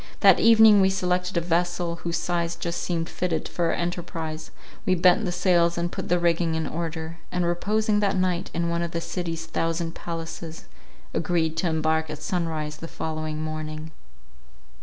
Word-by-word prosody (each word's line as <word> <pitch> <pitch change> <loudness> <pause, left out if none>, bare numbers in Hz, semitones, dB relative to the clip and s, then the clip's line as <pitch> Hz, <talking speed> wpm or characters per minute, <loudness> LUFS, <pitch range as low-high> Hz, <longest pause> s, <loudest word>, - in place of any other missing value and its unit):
That - - +7
evening 220 -3 +7
we 190 - +5
selected 180 -1 0
a - - +3
vessel, 175 0 0
whose 170 0 -2
size 170 -1 -1
just 170 0 -3
seemed 165 -2 -1
fitted 175 -3 -2
for 175 - -1
our 165 - +2
enterprize; 165 -2 -4 0.3
we 185 - +2
bent 180 +5 +4
the 180 - -1
sails 175 -1 +2
and 175 0 -1
put - - -5
the 175 - +4
rigging 170 -1 +1
in 160 0 -1
order, 165 0 -4
and 180 -1 0
reposing 205 +5 +1
that 200 -2 +1
night 180 -1 0
in 170 0 -1
one 170 0 0
of 170 -1 -3
the 170 - 0
city's 165 -2 -4
thousand 165 0 -2
palaces, 165 -1 -6 0.5
agreed 160 -2 0
to 180 - +1
embark 160 0 +1
at 150 - -6
sunrise 155 -2 -2
the 165 - -7
following 155 -1 -4
morning. 155 0 -5
170 Hz, 175 wpm, -25 LUFS, 160-180 Hz, 0.5 s, That